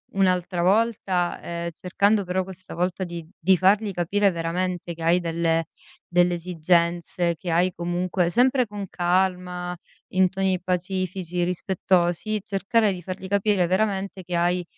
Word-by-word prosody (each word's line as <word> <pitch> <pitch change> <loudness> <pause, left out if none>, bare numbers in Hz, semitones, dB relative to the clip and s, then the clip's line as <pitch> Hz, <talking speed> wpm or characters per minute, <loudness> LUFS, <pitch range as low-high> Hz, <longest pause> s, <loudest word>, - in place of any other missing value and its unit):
un'altra 180 -2 +1
volta, 190 -2 +1
ehm, 170 0 -4
cercando 200 +5 +1
però 185 +1 0
questa 185 0 -10
volta 180 +2 -1
di 170 -2 -7
di 190 +3 +4
fargli 200 +3 +3
capire 200 +4 +2
veramente 175 +1 -2
che 165 - -12
hai 170 +2 +4
delle 165 -1 0 0.4
delle 175 0 +3
esigenze, 170 0 0
che 180 - -6
hai 175 +2 +2
comunque 175 +1 -1
sempre 250 +4 +3
con 205 -1 -6
calma, 180 0 0 0.3
in 185 0 +3
toni 190 -1 0
pacifici, 185 -1 -2
rispettosi, 180 +2 0
cercare 210 +2 +1
di 180 - -7
fargli 185 +2 -6
capire 200 -1 +2
veramente 195 0 -1
che 180 0 -4
hai 175 +1 +1
180 Hz, 140 wpm, -24 LUFS, 175-190 Hz, 0.4 s, di